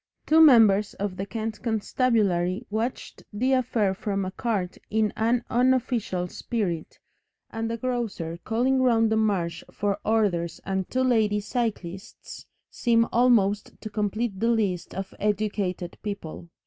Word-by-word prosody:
Two 320 +1 +5
members 220 -8 +6
of 200 -2 -3
the 195 +2 -5
Kent 220 +2 -4
constabulary 215 -6 +1
watched 225 +4 -3
the 250 +6 +1
affair 235 -6 +1
from 195 0 -2
a 185 - -4
cart 195 -4 -2
in 215 -1 +1
an 235 +2 +1
unofficial 245 -7 +1
spirit, 180 -5 -3 0.5
and 225 0 -3
a 230 - -2
grocer 220 -9 -3
calling 255 +4 +1
round 225 -3 +3
the - - +3
Marsh 185 -6 0
for 205 0 -1
orders 195 -7 0
and 190 -1 -2
two 260 0 0
lady 220 -5 +2
cyclists 200 -4 -5 0.2
seem 230 -1 +2
almost 220 -4 +2
to 215 - -8
complete 210 0 -2
the 230 - +2
list 205 -7 -1
of 195 0 -5
educated 200 -4 -2
people. 185 -5 -6
215 Hz, 135 wpm, -26 LUFS, 195-235 Hz, 0.5 s, members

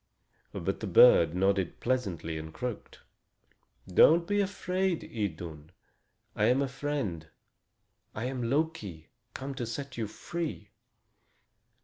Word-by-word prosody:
But - - -3
the - - -4
bird - - +7
nodded 95 -1 +1
pleasantly 95 -11 -1
and 80 0 -8
croaked: 125 +4 -6 0.9
"Don't 160 - +6
be 205 +3 +1
afraid, 190 -2 -1
Idun. 85 -7 -5 0.6
I 105 - +2
am 130 +5 +3
a - - -1
friend. 130 - -3 0.9
I 110 - -3
am 125 -2 -2
Loki, 125 - -2 0.3
come 135 +1 -5
to 125 -3 -4
set 135 +3 -6
you 110 - -1
free." 155 -5 -5
125 Hz, 115 wpm, -30 LUFS, 95-150 Hz, 0.9 s, bird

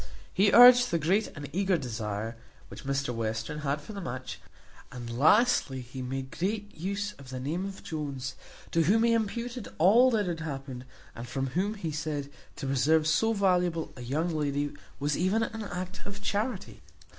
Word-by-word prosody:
He 200 +1 +4
urged 245 +2 +9
the 170 - +1
great 185 +7 +2
and 145 -1 -6
eager 190 0 +2
desire 115 -4 -4 0.3
which - - -10
Mr 135 -2 -1
Western 115 +5 -3
had 145 0 -1
for 160 +9 -10
the 200 - -6
match; 130 -4 -6 0.5
and 120 -2 -6
lastly, 160 - +4
he 125 +2 -8
made 130 +1 -4
great 205 +3 -3
use 200 +5 -3
of 135 -2 -12
the 130 -1 -5
name 160 +8 -2
of 195 -1 -9
Jones, 140 -4 -4 0.4
to 165 - +3
whom 220 +7 +4
he 230 0 +4
imputed 235 +1 -2
all 225 +10 +6
that 220 -4 +1
had 170 -2 -3
happened; 135 -5 -6 0.3
and 120 +1 -8
from 135 +1 -3
whom, 200 +7 0
he 170 -6 -4
said, 150 -2 -3 0.2
to 140 - -6
preserve 145 +4 +3
so 165 +9 +3
valuable 180 -5 +1
a 125 - -9
young 155 +8 -1
lady 145 -1 -1 0.3
was 145 +1 0
even 195 +6 +2
an 225 0 -4
act 185 0 -5
of 200 0 -7
charity. 205 0 -3
160 Hz, 180 wpm, -29 LUFS, 135-200 Hz, 0.5 s, urged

